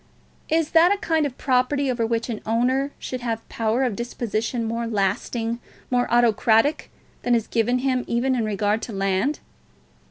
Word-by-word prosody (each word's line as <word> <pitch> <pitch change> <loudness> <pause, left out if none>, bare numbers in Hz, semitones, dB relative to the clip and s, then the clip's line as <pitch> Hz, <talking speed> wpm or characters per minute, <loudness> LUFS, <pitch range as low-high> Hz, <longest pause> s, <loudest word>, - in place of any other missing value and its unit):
Is 320 -1 +1
that 335 +3 +6
a 405 - +2
kind 320 -5 +1
of 260 - -10
property 265 +1 +1
over 235 -2 0
which 230 0 -1
an 225 -4 -4
owner 255 +5 +1
should 255 -1 -5
have 230 -2 -1
a - - -19
power 225 +3 +1
of 245 -6 0
disposition 235 0 -2
more 230 +1 -2
lasting, 225 +3 -1 0.3
more 245 0 +1
autocratic, 235 +3 +3 0.3
than 245 -1 +2
is 225 -2 0
given 235 +2 +1
him 255 -1 0
even 245 +3 +1
in 245 -3 0
regard 210 +1 0
to 230 - -6
land? 195 +8 0
235 Hz, 170 wpm, -23 LUFS, 225-260 Hz, 0.3 s, that